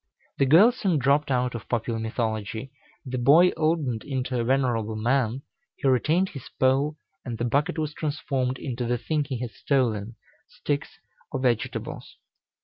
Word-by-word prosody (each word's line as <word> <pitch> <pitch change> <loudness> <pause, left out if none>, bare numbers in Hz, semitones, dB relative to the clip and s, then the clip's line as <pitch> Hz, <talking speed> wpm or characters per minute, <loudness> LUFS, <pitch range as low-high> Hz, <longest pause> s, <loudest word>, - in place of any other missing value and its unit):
The 135 - +4
girl 180 - +7
soon 195 -9 0
dropped 140 +2 +2
out 125 -2 +1
of 115 -2 -7
popular 115 -1 -1
mythology, 110 +1 -3 0.3
the 130 -1 -3
boy 155 +9 +6
oldened 155 -8 0
into 130 -2 -2
a - - +1
venerable 120 -4 +1
man, 120 +3 0 0.3
he - - -2
retained 155 +9 +2
his 135 -4 -9
pole, 135 +4 +2 0.3
and 120 -3 -5
the 120 - -1
bucket 145 +9 0
was 155 -1 -2
transformed 135 -4 -2
into 125 -3 -4
the 120 +1 +1
thing 150 +4 -1
he 135 -3 -4
had 120 -2 -4
stolen 115 -3 0 0.3
sticks 145 -1 -3 0.3
or - - -2
vegetables. 120 -4 -2
130 Hz, 155 wpm, -26 LUFS, 120-145 Hz, 0.3 s, girl